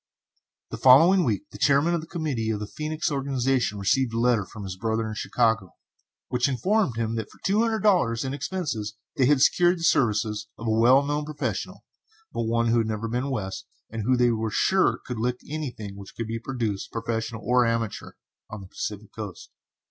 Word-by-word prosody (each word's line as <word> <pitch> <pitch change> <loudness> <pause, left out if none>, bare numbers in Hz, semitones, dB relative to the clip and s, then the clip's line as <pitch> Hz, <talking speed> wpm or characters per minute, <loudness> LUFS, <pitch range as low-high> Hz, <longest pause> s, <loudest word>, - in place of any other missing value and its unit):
The - - -5
following 165 +9 +7
week 120 +2 -1
the - - -11
chairman 145 +4 +3
of 170 - 0
the 160 - -11
committee 150 -10 -2
of 110 -2 -1
the 105 - -4
Phœnix 155 +7 -3
organization 135 -5 0
received 115 +5 +1
a - - 0
letter 115 -5 +2
from 105 +1 -9
his 95 -1 -5
brother 110 +3 -1
in 110 - -4
Chicago, 110 -4 0 0.5
which 125 +2 +1
informed 140 - +1
him 115 -1 -1
that 110 - -4
for - - -18
two 205 +3 +3
hundred 225 -3 0
dollars, 140 - +3
and 130 - -3
expenses, 135 - -3 0.2
they 130 - +3
had 145 -2 +4
secured 175 +1 +4
the 165 - -7
services 110 -7 +1
of 115 - -8
a 110 - +1
well 125 +5 +5
known 145 +1 -1
professional, 150 -1 -4 0.5
but 115 - -1
one 115 0 +1
who 115 +1 +3
had 110 - 0
never 110 +1 -3
been 125 +4 -2
West, 95 -8 -4 0.2
and 115 0 -4
who, 125 +4 +2
they 120 -1 +4
were 110 -1 -1
sure, 190 - +2
could 125 -3 -5
"lick" 125 +2 0
anything 125 -10 -5
which 100 -1 -11
could 115 - -3
be 115 +1 -4
produced, 115 -5 -3
professional 115 -1 -3
or 125 +2 +4
amateur, 115 -2 -2 0.4
on 105 -1 -7
the 95 - -11
Pacific 105 0 -6
Coast. 105 -5 -8
120 Hz, 200 wpm, -25 LUFS, 110-140 Hz, 0.5 s, following